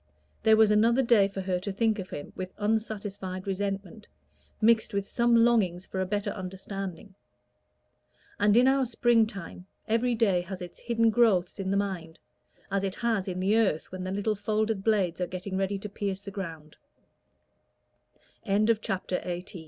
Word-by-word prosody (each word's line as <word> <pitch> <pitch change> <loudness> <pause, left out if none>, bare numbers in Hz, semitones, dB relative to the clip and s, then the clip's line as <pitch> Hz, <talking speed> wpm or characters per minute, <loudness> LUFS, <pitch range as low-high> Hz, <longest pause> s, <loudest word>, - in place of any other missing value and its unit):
There 220 -1 +5
was 220 -1 +5
another 230 +5 +4
day 230 -5 +5
for 195 -1 -5
her 185 -1 -1
to 200 +3 -4
think 220 +1 +1
of 185 -1 -6
him 145 - -7
with 185 0 -6
unsatisfied 205 -3 -2
resentment, 195 +1 -4 0.5
mixed 220 -2 +3
with 200 0 -1
some 235 -1 +2
longings 220 -7 +3
for 190 - -5
a 185 - -1
better 205 +1 -1
understanding: 190 0 -6 1.3
and 205 +1 +4
in 250 +2 +6
our 265 -1 +3
spring 230 -1 +3
time 190 -2 -9 0.2
every 235 +2 +1
day 200 -6 +2
has 185 +1 -7
its 180 -1 -9
hidden 230 -1 +2
growths 210 -6 +2
in 190 -1 -2
the 195 - +1
mind, 180 -5 -3 0.5
as 195 0 0
it 195 -1 -2
has 225 -5 -1
in 185 -1 -3
the 195 +3 +2
earth 200 -9 +1
when 185 0 -5
the 185 - -3
little 205 +2 0
folded 215 0 -1
blades 195 -5 +1
are 180 - 0
getting 185 +2 -5
ready 195 +1 0
to 195 - -6
pierce 200 -1 -3
the 200 0 -8
ground. 165 -6 -7 1.7
CHAPTER 205 -3 0
XIX. - - -13
Consistency? 180 +1 -5
200 Hz, 170 wpm, -28 LUFS, 185-220 Hz, 1.7 s, in